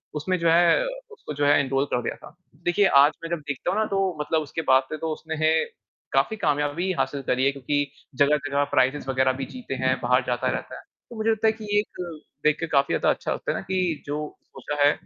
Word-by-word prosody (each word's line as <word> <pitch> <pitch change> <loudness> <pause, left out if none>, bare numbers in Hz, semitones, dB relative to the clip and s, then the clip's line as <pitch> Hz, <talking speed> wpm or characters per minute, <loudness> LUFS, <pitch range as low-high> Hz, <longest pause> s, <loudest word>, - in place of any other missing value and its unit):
उसमें 185 +5 -1
जो 170 -1 +2
है 175 - +4 0.3
उसको 155 - -8
जो 145 - +3
है 145 0 +5
एनरोल 135 0 +1
कर 125 - +1
दिया - - -3
था। - - -14 0.3
देखिए 185 +3 +3 0.2
आज 145 +2 +6
मैं 165 - -5
जब 170 -2 -1
देखता 145 +5 -2
हूँ 210 - 0
ना 220 - +2
तो 195 -5 -1
मतलब 155 +1 0
उसके 155 +2 -4
बाद 130 0 +6
से 155 - -3
तो 160 +1 -3
उसने 160 +1 -6 0.8
काफ़ी 220 - +2
कामयाबी 145 +4 0
हासिल 140 -1 -1
करी 130 0 0
है 140 - +4
क्योंकि 145 +2 -1 0.3
जगह-जगह 145 0 +2
प्राइज़ेज़ 135 +2 +1
वगैरह 130 0 +3
भी - - -2
जीते 250 - -6
हैं, 130 0 +2
बाहर 125 +1 +3
जाता 120 -1 0
रहता - - -5
है। - - -10 0.3
तो 235 - -10
मुझे 220 +1 0
लगता 220 0 +1
है - - +5
कि 220 -1 -10
ये 205 - +5
एक 175 -6 -6 0.2
देख 150 - +3
के 165 - -2
काफ़ी 140 -2 +2
ज़्यादा - - +2
अच्छा - - 0
लगता - - -3
है - - -2
ना - - -4
कि 180 -4 0
जो 145 +1 -3 0.3
सोचा 145 -1 -3
है 145 - +6
150 Hz, 235 wpm, -25 LUFS, 140-175 Hz, 0.8 s, आज